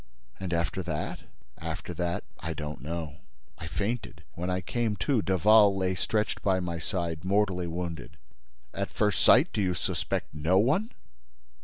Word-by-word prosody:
"And 95 -2 -4
after 85 +3 0
that?—" 80 -4 -3 0.4
"After - - -5
that, 85 -1 -2 0.2
I 80 0 -4
don't 75 -1 -5
know—I 75 -4 -8
fainted. 105 +6 -3
When 90 +2 -3
I 90 0 +1
came 110 +4 -1
to, 110 +5 +1
Daval 100 +2 +5
lay 95 -1 +1
stretched 105 +4 -1
by 95 -2 +2
my 85 -2 -3
side, 85 -2 -3
mortally 95 -2 +1
wounded." 85 -1 -5 0.6
"At - - -2
first 105 -2 +1
sight, 135 +9 +6
do 105 - 0
you 90 -2 +1
suspect - - -2
no 80 +5 +2
one?" 150 - +3
90 Hz, 150 wpm, -29 LUFS, 85-105 Hz, 0.6 s, sight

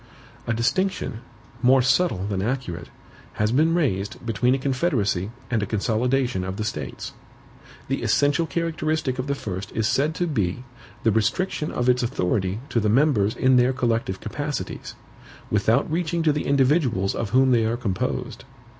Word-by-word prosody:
A 115 - +1
distinction, 150 - 0 0.4
more 130 +1 +5
subtle 130 - +2
than 100 -2 -2
accurate, 100 -7 -3 0.4
has 105 +1 0
been 160 +6 +3
raised 105 - -1
between 115 +3 +2
a - - 0
CONFEDERACY 130 - 0 0.2
and 115 -3 +1
a 105 - -2
CONSOLIDATION 120 +1 0
of 95 +1 -4
the 110 - -2
States. 110 - -5 0.7
The - - -1
essential 145 +3 +2
characteristic 155 -4 -1
of 130 - -2
the 140 - 0
first 95 -5 -5
is 110 -1 0
said 150 +7 +1
to 175 - 0
be, 115 - -1 0.4
the 115 - +4
restriction 150 - 0
of 120 - -1
its 125 0 +4
authority 100 -4 -1
to 115 - +1
the 105 -1 +1
members 115 -4 +3
in 130 -1 +4
their 125 +1 +4
collective 115 -6 -1
capacities, 145 +5 -5 0.6
without 105 +6 +2
reaching 170 0 0
to 155 -2 +3
the 150 - -2
individuals 135 - +2
of 115 - -3
whom 130 +4 +4
they 115 -2 +4
are 115 +2 0
composed. 100 -6 -3
125 Hz, 160 wpm, -24 LUFS, 105-145 Hz, 0.7 s, more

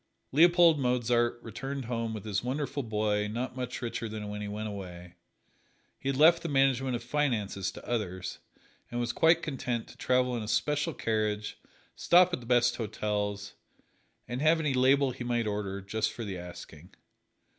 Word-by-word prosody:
Leopold 170 +1 +6
Mozart 120 -2 +1
returned 135 +4 -5
home 115 -1 -2
with 110 -2 -6
his 100 -1 -1
wonderful 140 +3 -2
boy 105 -3 0
not 120 +4 -4
much 130 0 -5
richer 115 -1 -3
than 105 -1 -5
when 105 0 -5
he 105 - -4
went 105 +1 -4
away. 90 -4 -8 0.9
He 135 - -3
had 135 - -1
left 165 +3 +6
the 170 - -4
management 135 -2 +2
of 120 - -5
finances 115 -8 -1
to - - -12
others, 95 -6 -3 0.5
and 120 - -3
was 120 0 -1
quite 165 0 +4
content 125 -5 -3
to - - -14
travel 125 -1 +1
in 120 - -3
a 105 - -6
special 145 +6 0
carriage, 110 -2 -1 0.4
stop 180 +1 +5
at - - -1
the 120 - -12
best 120 0 +3
hotels, 105 -2 -3 0.7
and 125 +2 -4
have 160 +2 +4
any 150 -4 0
"label" 130 +1 +4
he 125 - -7
might 120 -1 0
order, 100 -2 -3
just 105 +3 -1
for 115 - -6
the 100 -2 -4
asking. 90 -1 -11
120 Hz, 175 wpm, -29 LUFS, 105-135 Hz, 0.9 s, Leopold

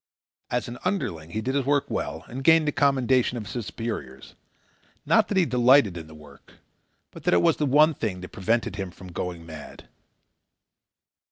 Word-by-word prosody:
As 125 - -1
an 120 +1 -8
underling 95 - -2
he 110 +5 -3
did 130 +4 -2
his 140 -1 +1
work 145 +1 +1
well - - -4
and 130 +2 -7
gained 160 +1 +5
the - - +2
commendation 130 -3 +2
of 110 - -5
his 110 +2 -5
superiors. 70 - -6 0.7
Not - - +4
that 205 - -1
he 185 - +4
delighted 125 - +4
in 80 -2 -8
the 80 - -13
work, 75 -2 -16 0.6
but - - -12
that - - +4
it 85 - +4
was - - +3
the 150 - 0
one 150 +4 +5
thing 100 -9 -4
that 90 - -8
prevented 110 0 -1
him 95 -2 -4
from 90 +1 -12
going 85 -1 -5
mad. 80 -2 -11
115 Hz, 185 wpm, -25 LUFS, 90-140 Hz, 0.7 s, gained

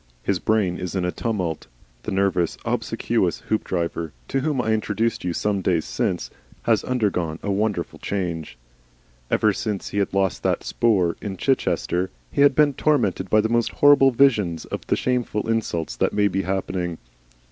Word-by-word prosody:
His 95 -3 0
brain 100 -5 +1
is 90 0 -5
in 90 -2 0
a 90 - 0
tumult. 90 -10 -3 0.3
The - - -5
nervous, 95 -3 +1
obsequious - - 0
Hoopdriver, 85 -6 -1 0.2
to 135 - +1
whom 145 -1 -1
I 110 -2 +1
introduced 110 +1 -1
you 90 - -1
some 100 +3 -1
days 85 -3 +1
since, - - -2 0.3
has - - +2
undergone 95 -10 -1
a 100 - -1
wonderful 100 -3 -1
change. 85 -5 -3 0.7
Ever 105 -1 +3
since 105 -1 -3
he 100 0 +1
lost 95 -1 0
that - - 0
'spoor' 95 -8 +1
in 100 -3 -5
Chichester, 95 -8 0 0.2
he - - +1
has 140 -1 +6
been 145 0 +4
tormented 125 -11 +1
by 110 - +5
the 110 - 0
most 120 0 +1
horrible 145 -2 +6
visions 110 - +2
of - - -5
the - - +2
shameful 125 -4 -1
insults 110 -8 -1
that - - +1
may 105 0 +3
be 95 0 -1
happening. 90 -2 -2
100 Hz, 165 wpm, -23 LUFS, 90-115 Hz, 0.7 s, has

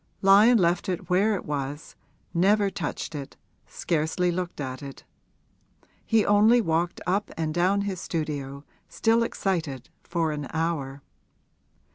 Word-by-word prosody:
Lyon 205 +5 +7
left 175 -1 +1
it 180 0 -4
where 205 +4 +3
it 190 - -6
was, 145 +1 -5 0.4
never 200 +3 +3
touched 165 -1 -4
it, 140 -3 -7 0.3
scarcely 165 +2 -1
looked 180 -1 -4
at 130 -2 -5
it; 140 -1 -9 1.0
he 225 -2 +2
only 215 +4 +5
walked 170 -4 0
up 195 +3 0
and 160 -1 -2
down 185 +4 +2
his 195 -3 -3
studio, 145 -4 -4 0.3
still 230 +1 +2
excited, 165 - -2
for 165 -2 -1
an 145 -2 -4
hour. 145 -4 -2
170 Hz, 130 wpm, -26 LUFS, 150-195 Hz, 1.0 s, Lyon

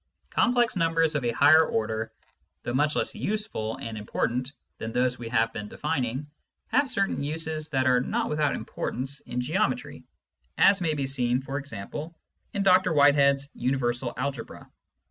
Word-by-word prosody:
Complex 240 -2 +2
numbers 165 -2 +2
of 145 -3 -1
a 120 - +1
higher 155 +6 +6
order, 110 -4 -2 0.5
though 120 - -3
much 150 +3 +2
less - - -1
useful 210 - -3
and 115 -1 -6
important 120 +5 -2 0.3
than 110 - -4
those 125 +1 +1
what 120 - -7
we - - -5
have 115 -1 +1
been 105 -1 -5
defining, 130 +5 -2 0.4
have 285 0 +2
certain 200 - 0
uses 155 +1 -2
that 135 -3 +1
are 125 -1 +4
not - - -1
without 150 -1 0
importance 135 +3 -4
in 125 - -5
geometry, 200 - -1 0.5
as 195 -1 +5
may 160 -3 +1
be 140 -2 -1
seen, 125 -2 +1
for 135 +1 -4
example, 145 +5 -7 0.3
in 200 - -1
Dr 185 -2 +5
Whitehead's 140 -1 +4
Universal 120 -1 -1
Algebra. 135 0 -5
140 Hz, 160 wpm, -27 LUFS, 125-160 Hz, 0.5 s, higher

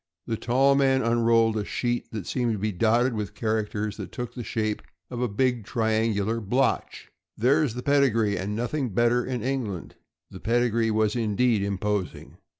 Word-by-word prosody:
Here - - -3
the - - -12
tall 135 +3 +3
man 135 -1 +3
unrolled 115 -1 +3
a 105 - -1
sheet 120 +3 -2
that 105 -5 -5
seemed 120 -3 0
to - - -2
be 105 +2 -1
dotted 115 +6 +2
with 105 -3 -4
characters 110 -1 -2
that - - -7
took 120 -2 -5
the 120 - -6
shape 110 -1 -2 0.3
of 120 -1 -4
a 125 - +1
big 120 +2 0
triangular 110 -1 0
blotch. 125 +7 -1
" - - -60
There's 135 +1 +2
the 125 - -5
pedigree, 120 -8 +2
and 100 +3 -3
nothing 120 +4 -2
better 120 +1 +3
in 125 -4 -3
England." 120 -9 -3 0.4
The - - -9
pedigree 115 0 +1
was 110 0 +1
indeed 115 0 +1
imposing. 100 0 -3
115 Hz, 175 wpm, -26 LUFS, 105-125 Hz, 0.4 s, tall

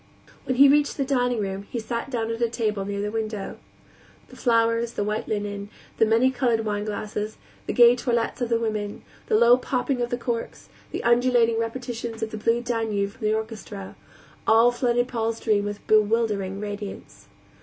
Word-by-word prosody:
When 255 - 0
he 280 +3 +8
reached 290 +1 +3
the 275 - 0
dining 245 -3 +1
room 195 0 -4
he - - -4
sat 235 +3 -4
down 230 -3 -2
at 230 +1 -4
a 235 - +2
table 215 -4 -1
near 200 0 -3
a - - -4
window. 215 -2 -4 0.7
The - - -13
flowers, 230 -1 +2
the - - -1
white 210 +1 -2
linen, 205 -1 -3 0.3
the 225 - +5
many 230 +4 +4
colored 245 -3 +1
wineglasses, 210 0 -3 0.3
the - - -1
gay 240 0 +7
toilettes 240 -1 -1
of 240 - 0
the 230 -1 +2
women, 215 -2 -3 0.2
the 215 - +3
low 235 +2 +6
popping 255 0 -1
of 240 - -1
corks, 235 -1 -4 0.2
the - - -5
undulating 235 -1 +3
repetitions 230 -1 -4
of 220 - -3
the 220 - -5
Blue 230 +2 +1
Danube 220 -4 -1
from 225 -1 -4
the 215 - +2
orchestra, 220 -3 -6 0.5
all 225 +2 +6
flooded 245 0 +1
Paul's 230 -2 -2
dream 210 -2 +1
with 205 0 -6
bewildering 210 -3 +2
radiance. 205 -1 -7
225 Hz, 175 wpm, -25 LUFS, 210-240 Hz, 0.7 s, he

